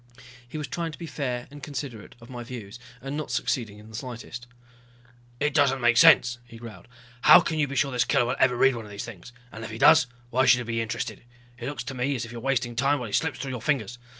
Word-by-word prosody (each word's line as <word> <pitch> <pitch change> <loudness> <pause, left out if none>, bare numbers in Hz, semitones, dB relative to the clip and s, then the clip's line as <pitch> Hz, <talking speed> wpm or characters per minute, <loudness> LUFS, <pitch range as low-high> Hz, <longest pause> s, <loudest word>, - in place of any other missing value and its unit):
He 155 - -6
was 150 -2 -4
trying 165 +4 -3
to - - -9
be 170 - -7
fair 125 -6 -4
and 145 0 -11
considerate 135 -6 -7
of 115 - -14
my 120 -1 -7
views, 115 -2 -9 0.2
and 135 +1 -4
not 155 0 -4
succeeding 110 -6 -2
in 105 +1 -14
the 110 - -11
slightest. 120 0 -7 0.9
"It 150 0 0
doesn't 140 -2 +3
make 120 -1 +3
sense," 120 0 +6
he 115 -1 -13
growled. 115 -1 -11 0.3
"How - - +9
can 160 -1 -2
you 145 - +2
be 140 - -6
sure 140 0 +1
this 125 -1 +2
killer 120 - +2
will 120 - -1
ever 125 -2 +4
read 135 +1 +4
one 115 - -6
of - - -11
these 100 0 -6
things. 115 -1 -11 0.2
And 110 - -8
if - - -6
he 110 - -7
does 125 - +6 0.2
why 130 +2 +3
should 125 0 +7
he 125 - -3
be 115 0 -2
interested? 115 0 -4 0.4
It 120 - -5
looks 145 -3 -4
to 135 - -6
me 130 +2 -1
as 120 -2 -3
if 115 - -11
you 120 - -7
are - - -11
wasting 125 -2 -1
time 140 +4 +2
while 125 - -5
he - - -10
slips 160 -4 0
through 135 - -5
your 125 -3 -5
fingers. 125 -3 -1
125 Hz, 260 wpm, -26 LUFS, 115-140 Hz, 0.9 s, How